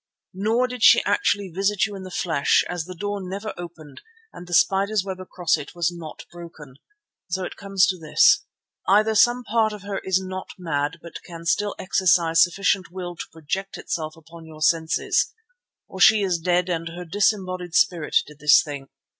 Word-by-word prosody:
Nor 220 Hz, +6 st, +1 dB
did 250 Hz, -2 st, -6 dB
she -, -, +7 dB
actually 205 Hz, -1 st, +1 dB
visit 195 Hz, +1 st, +1 dB
you 210 Hz, -2 st, -7 dB
in 195 Hz, -, -8 dB
the 185 Hz, -, -8 dB
flesh, 170 Hz, -5 st, +1 dB
as 175 Hz, -2 st, -4 dB
the 185 Hz, +1 st, -9 dB
door 205 Hz, +3 st, -4 dB
never 195 Hz, +3 st, -5 dB
opened 160 Hz, -5 st, -11 dB, 0.3 s
and 175 Hz, -, -11 dB
the 175 Hz, -, -8 dB
spider's 195 Hz, +2 st, +2 dB
web 190 Hz, -1 st, -5 dB
across 180 Hz, -2 st, -1 dB
it 145 Hz, -, -9 dB
was 170 Hz, 0 st, 0 dB
not 160 Hz, -2 st, -9 dB
broken. 160 Hz, -6 st, -12 dB, 0.5 s
So 185 Hz, +2 st, -2 dB
it -, -, -6 dB
comes 195 Hz, -1 st, +2 dB
to 185 Hz, -2 st, -2 dB
this: 155 Hz, -2 st, +4 dB, 0.4 s
either 215 Hz, +3 st, +4 dB
some 240 Hz, +3 st, +3 dB
part 220 Hz, -1 st, +1 dB
of 210 Hz, -2 st, -9 dB
her 200 Hz, -1 st, -4 dB
is 190 Hz, 0 st, +1 dB
not 185 Hz, 0 st, -7 dB
mad 155 Hz, -3 st, -2 dB
but 170 Hz, -, -9 dB
can 170 Hz, -1 st, -11 dB
still 205 Hz, +4 st, 0 dB
exercise 175 Hz, -3 st, +2 dB
sufficient 190 Hz, +1 st, +1 dB
will 175 Hz, 0 st, -7 dB
to -, -, -7 dB
project 165 Hz, +5 st, -5 dB
itself 155 Hz, -1 st, -5 dB
upon 165 Hz, 0 st, -14 dB
your 155 Hz, -1 st, -7 dB
senses, 160 Hz, 0 st, +1 dB, 0.6 s
or 190 Hz, -, -10 dB
she 215 Hz, +2 st, +6 dB
is 180 Hz, -3 st, 0 dB
dead 180 Hz, +1 st, +1 dB
and 165 Hz, -2 st, -2 dB
her 175 Hz, +2 st, -8 dB
disembodied 185 Hz, -2 st, -1 dB
spirit 175 Hz, -8 st, +1 dB
did 150 Hz, -1 st, -15 dB
this 150 Hz, -1 st, +6 dB
thing. 140 Hz, -3 st, -8 dB
180 Hz, 185 wpm, -23 LUFS, 165-195 Hz, 0.6 s, she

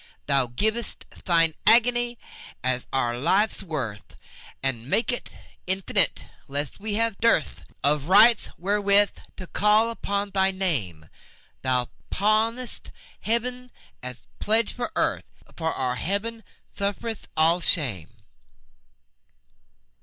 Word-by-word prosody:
Thou 135 Hz, -3 st, +2 dB
giv'st 220 Hz, -, -2 dB, 0.2 s
Thine 165 Hz, -2 st, +3 dB
agony 240 Hz, +1 st, +4 dB, 0.5 s
as 130 Hz, 0 st, 0 dB
our 120 Hz, -2 st, 0 dB
life's 200 Hz, -, +2 dB
worth, 130 Hz, -, -6 dB, 0.5 s
And 125 Hz, -2 st, -2 dB
mak'st 230 Hz, +11 st, +1 dB
it 245 Hz, -, -7 dB, 0.3 s
infinite, 190 Hz, +1 st, +1 dB, 0.2 s
lest 145 Hz, +4 st, -3 dB
we 210 Hz, 0 st, -2 dB
have 225 Hz, -2 st, 0 dB
dearthOf 150 Hz, -8 st, 0 dB
rights 215 Hz, +5 st, +6 dB
wherewith 200 Hz, +2 st, +3 dB, 0.3 s
to 185 Hz, -, -7 dB
call 210 Hz, +5 st, +3 dB
upon 200 Hz, -2 st, -3 dB
thy 190 Hz, 0 st, +3 dB
Name; 130 Hz, -, -2 dB, 0.5 s
Thou 125 Hz, -2 st, +1 dB, 0.2 s
pawnest 220 Hz, +4 st, 0 dB, 0.3 s
Heaven 250 Hz, +2 st, -1 dB, 0.3 s
as 125 Hz, -2 st, -7 dB
a -, -, -12 dB
pledge 220 Hz, +1 st, +2 dB
for 245 Hz, +5 st, -4 dB
Earth, -, -, 0 dB, 0.2 s
And -, -, -23 dB
for 160 Hz, -1 st, -1 dB
our 125 Hz, -1 st, -2 dB
glory 205 Hz, -, -2 dB, 0.3 s
sufferest 205 Hz, +2 st, -3 dB
all 165 Hz, +3 st, +4 dB
shame. 120 Hz, -, 0 dB
195 Hz, 115 wpm, -25 LUFS, 140-220 Hz, 0.5 s, rights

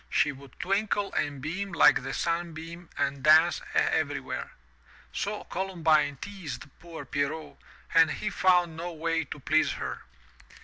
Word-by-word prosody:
She 150 Hz, -, +2 dB
would 135 Hz, -1 st, -14 dB
twinkle 200 Hz, +1 st, 0 dB
and 145 Hz, -3 st, -2 dB
beam 195 Hz, +6 st, -3 dB
like -, -, +6 dB
the 135 Hz, -, -5 dB
sunbeam 170 Hz, 0 st, -3 dB
and 140 Hz, 0 st, -1 dB
dance 155 Hz, +4 st, +5 dB
everywhere. -, -, 0 dB, 0.6 s
So -, -, -3 dB
Columbine 160 Hz, -6 st, +1 dB
teased 175 Hz, -11 st, -7 dB, 0.2 s
poor 165 Hz, -4 st, -9 dB
Pierrot 145 Hz, +3 st, -3 dB, 0.4 s
and 165 Hz, -1 st, +6 dB
he 210 Hz, +7 st, -3 dB
found 180 Hz, -4 st, +3 dB
no 170 Hz, +2 st, -5 dB
way 165 Hz, +1 st, -1 dB
to 145 Hz, -, -8 dB
please 155 Hz, +3 st, +2 dB
her. -, -, -5 dB
165 Hz, 135 wpm, -28 LUFS, 150-175 Hz, 0.6 s, like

